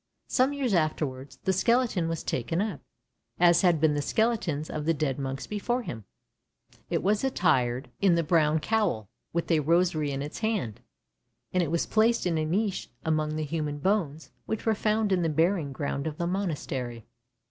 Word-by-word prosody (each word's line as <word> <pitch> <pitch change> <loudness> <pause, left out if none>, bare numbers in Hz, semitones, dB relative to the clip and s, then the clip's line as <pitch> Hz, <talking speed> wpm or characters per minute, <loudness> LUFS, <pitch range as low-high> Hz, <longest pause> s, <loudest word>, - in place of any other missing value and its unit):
Some 260 +2 +2
years 275 -6 -1
afterwards 150 -5 -1
the 190 - +2
skeleton 225 -4 +2
was 165 -1 -3
taken 130 +8 -1
up, 200 -7 -2 0.6
as 175 -1 +6
had 175 -4 +4
been 155 0 +3
the 145 - 0
skeletons 180 - 0
of 150 -1 -4
the 165 0 +2
dead 145 -3 -1
monks 135 0 -4
before 240 +4 -2
him; 110 - -7 0.8
it - - 0
was 205 +4 +2
attired 130 - +1
in 190 -4 +5
the 170 - +2
brown 155 -1 +3
cowl, 160 - 0 0.2
with 170 +1 -1
a 160 - +4
rosary 160 -1 +2
in 140 0 -3
its 150 - -6
hand, 200 - -1 0.7
and 180 - +3
it 165 - 0
was 170 +1 0
placed 225 0 +2
in 165 -3 +1
a 155 - 0
niche 195 +5 -1 0.2
among 155 -1 0
the 155 - -1
human 150 -1 -2
bones 160 -3 -1 0.2
which 220 - -3
were 225 - +3
found 215 0 +1
in 185 -2 +3
the 165 - +1
burying 160 -1 +1
ground 140 +1 -3
of 155 -1 -5
the 170 - -1
monastery. 145 - -3
165 Hz, 180 wpm, -28 LUFS, 145-200 Hz, 0.8 s, as